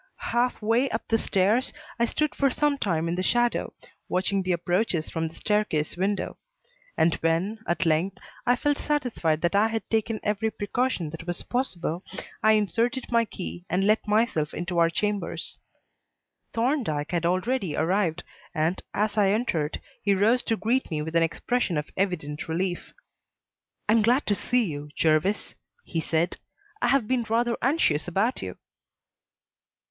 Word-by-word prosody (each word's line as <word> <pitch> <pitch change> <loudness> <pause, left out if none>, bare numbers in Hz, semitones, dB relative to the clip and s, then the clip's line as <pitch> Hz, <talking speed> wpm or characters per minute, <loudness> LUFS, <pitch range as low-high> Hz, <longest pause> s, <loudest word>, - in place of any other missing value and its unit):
Half 240 -1 +1
way 235 +5 +3
up 225 - -3
the 225 - +3
stairs, 210 +8 +2 0.3
I 235 - +4
stood 305 +5 -1
for 275 - +2
some 295 +2 +1
time 170 -6 0
in 165 - 0
the 180 - -1
shadow, 240 +5 +1 0.4
watching 190 +2 +1
the 185 0 -1
approaches 175 -1 0
from 160 -1 -1
the 160 - -11
staircase 210 -8 0
window; 195 +3 -1 0.6
and 165 0 +4
when, 170 +7 0
at 175 +1 0
length, 170 +4 +1 0.3
I 245 - +4
felt 290 +3 0
satisfied 240 - 0
that 170 +1 +1
I 205 +2 +4
had 225 -2 -3
taken 225 0 +1
every 210 +1 0
precaution 205 -6 -1
that 165 +2 -8
was 175 0 -2
possible, 185 -8 -2 0.4
I 220 +1 +5
inserted 230 +5 0
my 230 -1 +4
key 180 -4 -7
and 190 +2 +1
let 215 +1 +2
myself 210 -8 +1
into 175 0 -1
our 165 0 +5
chambers. 205 +3 -2 0.9
Thorndyke 230 - 0
had 170 -1 +1
already 185 - 0
arrived, 175 0 +1 0.3
and, 160 +4 +1
as 210 +1 +1
I 200 -2 +5
entered, 185 -9 0 0.2
he 200 -1 +3
rose 225 +6 +3
to 225 - +1
greet 235 +7 0
me 150 -2 -2
with 160 +2 -5
an 165 - +5
expression 175 +3 0
of 150 - -3
evident 155 -6 -2
relief. 175 +2 -2 1.0
"I 210 - +4
am 225 - +5
glad 245 +6 +3
to 205 - +2
see 245 +4 +1
you, 150 -6 -5
Jervis," 160 +6 +1 0.3
he 165 - -2
said. 165 +2 0 0.4
"I - - +3
have 255 -3 +3
been 255 -1 +1
rather 235 +1 +2
anxious 235 - +2
about 200 +8 0
you." - - -6
200 Hz, 165 wpm, -26 LUFS, 170-230 Hz, 1.0 s, I